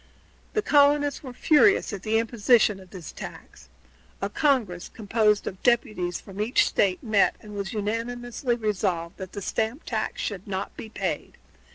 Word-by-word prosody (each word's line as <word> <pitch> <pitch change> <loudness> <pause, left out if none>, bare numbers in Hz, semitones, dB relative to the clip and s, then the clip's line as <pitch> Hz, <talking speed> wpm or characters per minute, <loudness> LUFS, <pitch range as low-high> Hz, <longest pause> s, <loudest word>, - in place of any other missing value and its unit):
The 425 - +1
colonists 290 -4 +4
were 260 - -8
furious 310 - +4
at 195 - -5
the 220 +3 +1
imposition 225 -2 +3
of 185 -1 -14
this 180 -4 -9
tax. - - -10 0.5
A - - -2
Congress, 230 - +1
composed 210 -1 +1
of 190 - -6
deputies 215 -7 +1
from 195 +1 -7
each 225 +4 +3
State, 185 -2 +1
met, 215 -4 +3
and 210 -1 -11
it - - -8
was 200 +1 -3
unanimously 240 +3 -2
resolved 190 -6 -1
that 190 -2 -8
the 200 - -5
stamp 225 - -2
tax - - -2
should 200 -2 -4
not 190 -1 -4
be 220 - -8
paid. 220 - -4
215 Hz, 165 wpm, -26 LUFS, 195-245 Hz, 0.5 s, colonists